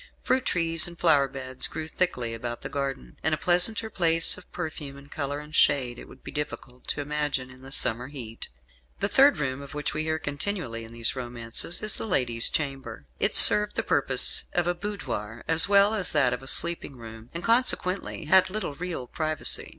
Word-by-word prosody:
Fruit 260 0 0
trees 165 -4 0
and 170 0 -12
flower 140 -4 +3
beds 130 -1 -3
grew 155 0 -7
thickly 125 -9 -2
about 120 +1 -6
the - - -7
garden, 135 - -6
and 155 +1 0
a - - -12
pleasanter 180 +7 +2
place 165 -4 +3
of - - -16
perfume 155 -5 -7
and 140 0 -17
colour 145 -1 -4
and 150 +1 -13
shade 125 -6 +1
it - - -12
would - - -17
be - - -9
difficult 135 -4 -8
to 145 - -3
imagine 145 -3 -3
in 130 0 -16
the 135 +1 -12
summer 120 -1 +1
heat. 120 -6 -8 0.5
The 200 - +1
third 270 - +4
room 140 -2 -4
of 140 +1 -11
which 150 - -3
we 155 - -2
hear 160 0 -2
continually 145 - -5
in 115 - -12
these 115 +1 +2
romances 120 - -3
is 215 - 0
the - - -5
lady's 120 - +2
chamber. 135 - -5
It - - -1
served 210 0 +8
the - - -2
purpose - - +5
of 175 - 0
a 175 - 0
boudoir 125 - -7
as 160 +4 +5
well 200 +1 +4
as 195 -5 -2
that 135 -5 +2
of 125 - -6
a 135 - -13
sleeping 170 -2 +3
room, 115 0 -12
and 170 +1 -8
consequently 200 -8 0
had 185 +5 +4
little 195 -6 -5
real 170 -4 -6
privacy. 155 +4 -2
145 Hz, 200 wpm, -25 LUFS, 125-175 Hz, 0.5 s, served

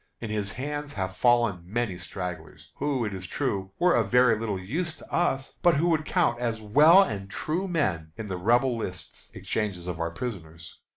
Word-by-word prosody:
In 115 -2 -5
his 105 -1 -2
hands 145 +2 -4
have 95 -1 -3
fallen 120 -7 +3
many 105 +2 -2
stragglers, 90 -3 -7
who, 135 -5 0
it 105 - -3
is 95 -1 -6
true, 100 -8 -2
were 180 0 +4
of - - +2
very 125 -1 +5
little 105 -2 -2
use 160 - -3
to - - -15
us, 135 -6 0
but 175 -2 +5
who 165 +5 +2
would 155 -2 +1
count 120 -3 +1
as 115 -2 -1
well 150 - +7
as 105 - -3
true 160 - -2
men 95 - -1
in 110 - -5
the 95 - -3
Rebel 120 +7 +3
lists 95 -5 -6
of - - -25
exchanges 100 -5 -3
of 90 -2 -4 0.2
prisoners. 85 -9 -7
115 Hz, 190 wpm, -27 LUFS, 95-145 Hz, 0.2 s, well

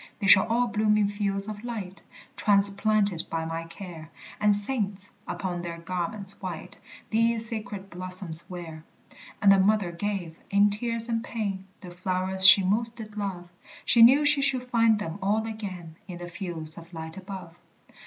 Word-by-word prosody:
"They - - -4
shall 190 +1 +6
all 235 +2 +1
bloom 215 -2 +1
in 210 -1 +2
fields 200 -1 -2
of 215 0 -7
light, 205 -6 -6 0.3
Transplanted 200 -2 +2
by 165 0 -3
my 165 0 -5
care, 165 -2 -10 0.3
And 210 0 +3
saints, 205 -3 -4 0.2
upon 180 -2 -4
their 170 -1 -6
garments 185 +4 -5
white, 180 -4 -7 0.3
These 230 0 +1
sacred 210 -3 -7
blossoms 180 -2 +1
wear." 165 -3 -8 0.6
And 200 - +7
the 195 - +5
mother 200 -2 +2
gave, 175 -2 -4
in 200 +1 +3
tears 230 +2 +1
and 230 -1 -2
pain, 200 -5 -4
The 180 - -10
flowers 185 +1 +3
she 195 0 +9
most 225 +5 0
did 215 -2 -10
love; 190 -4 -5 0.4
She 235 - +5
knew 270 +6 +7
she 290 -1 +4
should 265 -2 +1
find 230 -2 +4
them 185 -2 -6
all 210 +3 0
again 190 -7 -7
In 180 -2 -8
the 175 0 -8
fields 170 -3 -4
of 170 +1 -15
light 160 0 -7
above. 190 -3 -9
200 Hz, 165 wpm, -26 LUFS, 175-215 Hz, 0.6 s, she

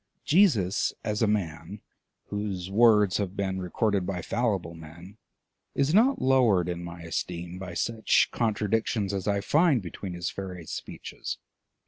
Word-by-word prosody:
Jesus 125 - +3
as 105 +1 -2
a 110 - +4
man, 95 -8 -2 0.5
whose 100 -3 -4
words 105 -3 +5
have 100 -2 -3
been 95 -1 -1
recorded 100 +2 0
by 90 -2 -3
fallible 105 -8 -1
men, 85 +6 -12 0.6
is 140 +3 +1
not 245 +7 +4
lowered 120 -10 +3
in 85 -1 -4
my 85 0 -8
esteem 85 +2 -4
by 90 -2 -7
such 110 +4 +2
contradictions 110 -2 0
as 95 0 -3
I 100 -1 +1
find 155 - +3
between 95 0 -7
his 85 -1 -3
various 90 -4 -7
speeches. - - -6
100 Hz, 140 wpm, -27 LUFS, 90-110 Hz, 0.6 s, words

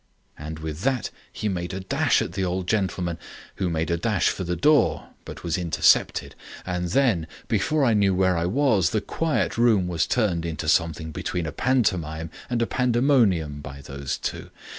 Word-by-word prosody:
And 75 +1 -7
with 80 +1 -6
that 130 -1 0 0.2
he 110 - -3
made 90 -2 -3
a - - -3
dash 95 - +1
at - - -6
the 95 +2 -2
old 90 0 -1
gentleman, 90 -5 -1 0.4
who 95 -2 0
made 80 0 -1
a 85 - +1
dash 105 +3 +1
for 95 - -3
the 90 0 -2
door, 150 - +2 0.2
but - - -9
was 85 +1 -1
intercepted. 85 -2 +2 0.3
And 90 -1 -2
then, 105 -8 +2 0.2
before 135 +8 +1
I 115 - +3
knew 100 -3 +3
where 95 -1 +2
I 85 +1 0
was 110 - +2
the 110 - 0
quiet 160 -4 -1
room 110 -6 +4
was 85 -2 0
turned 100 -9 +1
into 80 -1 -4
something 80 -1 +1
between 85 +2 -3
a 75 - -3
pantomime 85 - 0 0.2
and 120 -1 +1
a - - +1
pandemonium 115 - +2
by 70 -1 -9
those 70 -1 -5
two. - - -5
90 Hz, 185 wpm, -24 LUFS, 80-110 Hz, 0.4 s, room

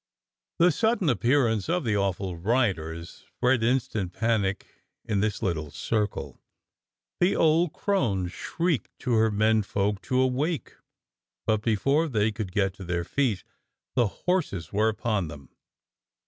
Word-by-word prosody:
The 175 +1 +5
sudden 220 0 +1
appearance 120 - +2
of 175 0 +1
the 110 -4 0
awful 95 -2 -1
riders 85 -5 -1
spread 125 -1 +3
instant 115 -6 0
panic 110 -4 0 0.4
in 105 -3 0
this 105 +2 -1
little 80 -6 -1
circle. 105 +7 -2 0.8
The 180 +2 +3
old 165 +1 +3
crone 115 - 0
shrieked 165 - -2
to 125 - -2
her 110 0 +4
menfolk 105 -2 +1
to 130 -1 +2
awake, 135 +5 0 0.7
but 110 -1 +1
before 135 +9 +2
they 110 -5 +1
could 105 -4 -5
get 95 -1 +1
to 95 - -8
their 90 -1 -2
feet 115 -1 0 0.5
the 120 -3 +3
horses 145 - -2
were 105 +2 +3
upon 105 -4 -1
them. 70 -3 -11
110 Hz, 135 wpm, -27 LUFS, 95-130 Hz, 0.8 s, The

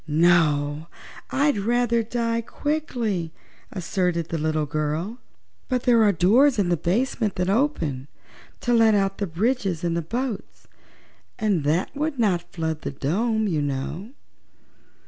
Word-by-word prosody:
"No, 155 -2 +2 0.4
I'd 280 -4 +1
rather 235 +2 +1
die 230 0 -1
quickly," 235 - -2 0.4
asserted 180 -3 -1
the 165 - -2
little 155 0 0
girl. 155 - -3 0.5
"But 250 -1 0
there 240 -3 +4
are 210 -2 +5
doors 225 - +4
in 195 -4 +1
the 175 - +3
basement 210 - 0
that 180 +1 0
open 170 - 0 0.5
to 240 - +1
let 225 -2 +5
out 195 -1 0
the 200 - -1
bridges 190 -1 -1
and 170 -1 0
the 170 - 0
boats 235 +6 -5 0.7
and 200 -8 +1
that 165 - 0
would 300 0 -2
not 195 -7 0
flood 160 -2 -3
the - - -3
dome, 215 - 0
you 160 -6 0
know." 145 - -4
195 Hz, 140 wpm, -24 LUFS, 160-235 Hz, 0.7 s, are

